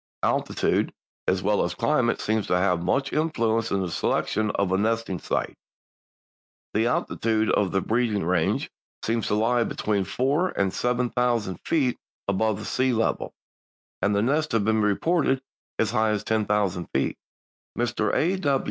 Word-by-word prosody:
Altitude -, -, +1 dB, 0.4 s
as -, -, +1 dB
well -, -, +2 dB
as -, -, -2 dB
climate -, -, +1 dB
seems 110 Hz, -1 st, 0 dB
to 90 Hz, -, +2 dB
have 90 Hz, -2 st, +2 dB
much 135 Hz, +9 st, 0 dB
influence 115 Hz, -8 st, +1 dB
in 100 Hz, -, 0 dB
the 90 Hz, -2 st, -3 dB
selection 110 Hz, +5 st, 0 dB
of 100 Hz, -2 st, 0 dB
a 95 Hz, -, +3 dB
nesting 110 Hz, -3 st, 0 dB
sight. -, -, -2 dB, 1.2 s
The 110 Hz, +3 st, +2 dB
altitude 110 Hz, -2 st, 0 dB
of 100 Hz, -3 st, +2 dB
the 95 Hz, -, +1 dB
breeding 110 Hz, -3 st, 0 dB
range 85 Hz, -2 st, 0 dB, 0.3 s
seems 115 Hz, 0 st, 0 dB
to -, -, +1 dB
lie 115 Hz, +3 st, +2 dB
between 105 Hz, -3 st, -1 dB
four 145 Hz, -, +1 dB
and 100 Hz, -1 st, +1 dB
seven 125 Hz, 0 st, 0 dB
thousand 120 Hz, -6 st, 0 dB
feet 135 Hz, -7 st, +1 dB, 0.3 s
above 100 Hz, +1 st, +1 dB
the 105 Hz, -, -7 dB
sea 130 Hz, +2 st, +1 dB
level, 115 Hz, -1 st, -1 dB, 0.7 s
and 105 Hz, 0 st, +2 dB
nests 140 Hz, +9 st, +1 dB
have 110 Hz, -3 st, +2 dB
been 110 Hz, 0 st, +2 dB
reported 135 Hz, -, +1 dB, 0.3 s
as 110 Hz, -2 st, +1 dB
high 110 Hz, -2 st, +2 dB
as 105 Hz, -1 st, -1 dB
ten 110 Hz, -1 st, 0 dB
thousand 100 Hz, -5 st, 0 dB
feet. 65 Hz, -, -1 dB, 0.6 s
Mr. 115 Hz, -3 st, 0 dB
A. 160 Hz, -5 st, +2 dB
110 Hz, 155 wpm, -25 LUFS, 100-125 Hz, 1.2 s, a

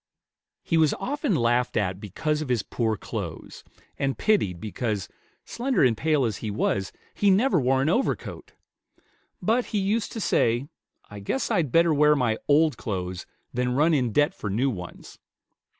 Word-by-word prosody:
He 165 Hz, -, +1 dB
was 155 Hz, -2 st, +3 dB
often 285 Hz, -, -1 dB
laughed 120 Hz, -1 st, +1 dB
at 95 Hz, -3 st, -1 dB
because 150 Hz, -, -2 dB
of 150 Hz, -, -5 dB
his 120 Hz, -4 st, +1 dB
poor 110 Hz, -3 st, -1 dB
clothes, -, -, -7 dB, 0.4 s
and 135 Hz, -1 st, -1 dB
pitied 105 Hz, -, +1 dB
because, 105 Hz, -2 st, -3 dB, 0.4 s
slender 250 Hz, -, 0 dB
and 125 Hz, -3 st, +4 dB
pale 150 Hz, +1 st, +1 dB
as 110 Hz, -5 st, -2 dB
he 110 Hz, -, -5 dB
was, 100 Hz, -1 st, -1 dB, 0.2 s
he 205 Hz, -, +2 dB
never 195 Hz, 0 st, +3 dB
wore 130 Hz, +1 st, +2 dB
an -, -, 0 dB
overcoat; 240 Hz, +10 st, -2 dB, 0.9 s
but 235 Hz, +3 st, +2 dB
he 215 Hz, -, -3 dB
used 205 Hz, +3 st, 0 dB
to 225 Hz, -, -4 dB
say, 120 Hz, -, +1 dB, 0.4 s
"I 105 Hz, -, -8 dB
guess 130 Hz, +7 st, -2 dB
I'd 155 Hz, -8 st, +1 dB
better 165 Hz, +2 st, +4 dB
wear 150 Hz, +1 st, +5 dB
my 120 Hz, -5 st, 0 dB
old 150 Hz, +1 st, +3 dB
clothes 90 Hz, -5 st, -4 dB, 0.3 s
than 125 Hz, 0 st, 0 dB
run 155 Hz, +4 st, +3 dB
in 125 Hz, -6 st, +1 dB
debt 145 Hz, +7 st, +2 dB
for 105 Hz, -, -5 dB
new 125 Hz, +8 st, +1 dB
ones." 90 Hz, -5 st, -9 dB
135 Hz, 165 wpm, -25 LUFS, 110-165 Hz, 0.9 s, wear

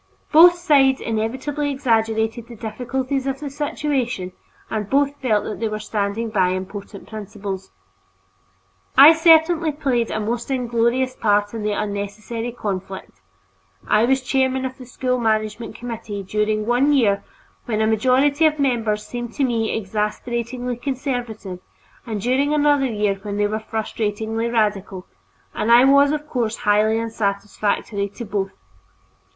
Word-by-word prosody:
Both 345 Hz, +3 st, +8 dB
sides 285 Hz, -7 st, +3 dB
inevitably 260 Hz, +7 st, -2 dB
exaggerated 225 Hz, -3 st, 0 dB
the 235 Hz, -, -10 dB
difficulties 255 Hz, +5 st, -3 dB
of 270 Hz, 0 st, -2 dB
the 290 Hz, -2 st, -6 dB
situation, 270 Hz, -9 st, -2 dB, 0.4 s
and 210 Hz, -2 st, -3 dB
both 280 Hz, +1 st, +2 dB
felt 220 Hz, -6 st, +1 dB
that 210 Hz, -, -5 dB
they 225 Hz, -, 0 dB
were 215 Hz, 0 st, -3 dB
standing 215 Hz, +1 st, -2 dB
by 190 Hz, -4 st, +3 dB
important 200 Hz, +2 st, -7 dB
principles. 200 Hz, -3 st, -6 dB, 1.3 s
I 290 Hz, +4 st, +10 dB
certainly 320 Hz, 0 st, +4 dB
played 260 Hz, -5 st, -1 dB
a 220 Hz, -, -2 dB
most 230 Hz, +4 st, -3 dB
inglorious 250 Hz, 0 st, 0 dB
part 205 Hz, -1 st, +1 dB
in 225 Hz, -, -4 dB
this 210 Hz, -1 st, -1 dB
unnecessary 210 Hz, +3 st, -4 dB
conflict; 190 Hz, -, -6 dB, 0.7 s
I 215 Hz, +2 st, +4 dB
was 265 Hz, +1 st, +1 dB
chairman 265 Hz, 0 st, +1 dB
of 260 Hz, 0 st, -6 dB
the 255 Hz, -, -10 dB
School 250 Hz, 0 st, -1 dB
Management 220 Hz, 0 st, -1 dB
Committee 225 Hz, -4 st, -6 dB
during 210 Hz, +2 st, -1 dB
one 250 Hz, +5 st, +3 dB
year 210 Hz, -8 st, +2 dB, 0.4 s
when 220 Hz, -3 st, -1 dB
a 220 Hz, -, +2 dB
majority 260 Hz, +7 st, +3 dB
of 305 Hz, -, 0 dB
the 290 Hz, -, -1 dB
members 225 Hz, -5 st, 0 dB
seemed 240 Hz, -1 st, -6 dB
to 280 Hz, -, -1 dB
me 230 Hz, -4 st, 0 dB
exasperatingly 235 Hz, +4 st, -3 dB
conservative, 245 Hz, -8 st, -4 dB, 0.5 s
and 220 Hz, -2 st, -3 dB
during 270 Hz, +7 st, +1 dB
another 290 Hz, -2 st, +3 dB
year 210 Hz, -4 st, -1 dB
when 205 Hz, 0 st, -5 dB
they 205 Hz, -, +2 dB
were 215 Hz, +1 st, -1 dB
frustratingly 220 Hz, +1 st, -3 dB
radical, 205 Hz, -4 st, -1 dB, 0.5 s
and 215 Hz, +2 st, 0 dB
I 240 Hz, +2 st, +8 dB
was 280 Hz, +1 st, +5 dB
of 300 Hz, 0 st, -3 dB
course 235 Hz, -5 st, -1 dB
highly 210 Hz, +2 st, +3 dB
unsatisfactory 205 Hz, -1 st, -2 dB
to 235 Hz, -, -6 dB
both. 200 Hz, -2 st, -2 dB
230 Hz, 145 wpm, -21 LUFS, 210-265 Hz, 1.3 s, I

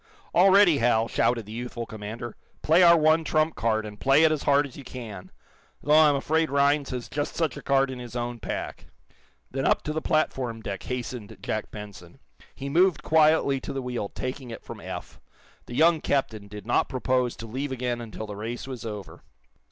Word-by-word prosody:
"All 185 Hz, +3 st, +6 dB
ready, 190 Hz, -6 st, +6 dB
Hal!" 115 Hz, -1 st, +3 dB
shouted 115 Hz, -2 st, +1 dB
the 105 Hz, -, -11 dB
youthful 120 Hz, 0 st, -5 dB
commander. 110 Hz, +2 st, -7 dB, 0.3 s
"Play 165 Hz, +4 st, +5 dB
our 170 Hz, -1 st, +8 dB
one 155 Hz, +1 st, +4 dB
trump 155 Hz, 0 st, +1 dB
card, 110 Hz, -1 st, 0 dB
and 105 Hz, -1 st, -9 dB
play 135 Hz, +3 st, +4 dB
it 160 Hz, -, +5 dB
as 155 Hz, -2 st, -1 dB
hard 145 Hz, +1 st, +3 dB
as 135 Hz, -, -11 dB
you 140 Hz, -, -9 dB
can! 115 Hz, -7 st, -8 dB, 0.5 s
Though 150 Hz, -, +2 dB
I'm 155 Hz, -2 st, +6 dB
afraid 160 Hz, +3 st, +1 dB
Rhinds 140 Hz, +1 st, +2 dB
has 125 Hz, -2 st, -4 dB
just 145 Hz, 0 st, -3 dB
such 160 Hz, -7 st, 0 dB
a -, -, -8 dB
card 135 Hz, -1 st, +2 dB
in 130 Hz, -, -7 dB
his 120 Hz, -1 st, -9 dB
own 120 Hz, 0 st, -3 dB
pack." -, -, -5 dB, 0.6 s
Then 135 Hz, +1 st, -1 dB
up -, -, +2 dB
to 150 Hz, -, -3 dB
the 160 Hz, -, -2 dB
platform 130 Hz, -7 st, 0 dB
deck 100 Hz, -3 st, -5 dB
hastened 125 Hz, -3 st, -5 dB
Jack 110 Hz, -, -3 dB
Benson. 105 Hz, -5 st, -10 dB, 0.4 s
He 140 Hz, -, -6 dB
moved 175 Hz, +2 st, +3 dB
quietly 155 Hz, -3 st, +4 dB
to -, -, -6 dB
the 135 Hz, -, -3 dB
wheel, 125 Hz, -5 st, -3 dB
taking 130 Hz, 0 st, -5 dB
it 115 Hz, -, -8 dB
from -, -, -9 dB
Eph. -, -, -8 dB, 0.5 s
The 120 Hz, -, -7 dB
young 160 Hz, +2 st, +4 dB
captain 110 Hz, -7 st, -1 dB
did 105 Hz, -1 st, -9 dB
not 120 Hz, -, +1 dB
propose 125 Hz, -1 st, 0 dB
to 115 Hz, -, -8 dB
leave 130 Hz, +5 st, -4 dB
again 125 Hz, -2 st, -2 dB
until 110 Hz, -1 st, -7 dB
the 105 Hz, -1 st, -7 dB
race 115 Hz, +4 st, -5 dB
was 130 Hz, -3 st, -7 dB
over. 105 Hz, -3 st, -7 dB
130 Hz, 200 wpm, -26 LUFS, 115-150 Hz, 0.6 s, our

